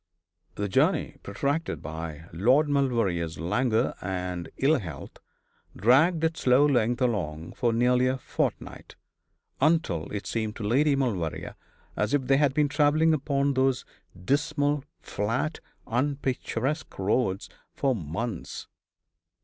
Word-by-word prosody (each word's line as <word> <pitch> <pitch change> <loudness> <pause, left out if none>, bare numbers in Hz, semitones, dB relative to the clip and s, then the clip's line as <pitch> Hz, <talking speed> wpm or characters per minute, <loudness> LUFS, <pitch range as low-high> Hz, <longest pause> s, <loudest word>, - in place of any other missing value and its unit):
The 105 - -2
journey, 95 - +1
protracted 140 +10 -2
by 80 +1 -6
Lord 125 - +3
Maulevrier's 115 - 0
languor 110 - +1
and 90 -2 -4
ill 145 +2 +3
health, 80 -8 -8 0.6
dragged 150 - +4
its 160 0 0
slow 130 +3 +5
length 125 -3 +2
along 85 -9 -2
for 120 -2 +1
nearly 125 +2 +3
a 130 +1 0
fortnight; 130 - -4 0.7
until 140 - +1
it 105 -1 -4
seemed 110 -2 -2
to 115 - -6
Lady 140 +7 +3
Maulevrier 105 - -2 0.4
as 145 - +1
if 140 - 0
they 135 +1 +3
had 140 -2 +2
been 150 -1 +3
travelling 150 +3 +3
upon 140 -1 +1
those 130 -1 +1 0.4
dismal, 145 - +1 0.2
flat, 115 +10 -2 0.3
unpicturesque 135 +3 -2
roads 95 0 0 0.2
for 135 -1 0
months. 95 +3 -5
125 Hz, 120 wpm, -27 LUFS, 95-145 Hz, 0.7 s, slow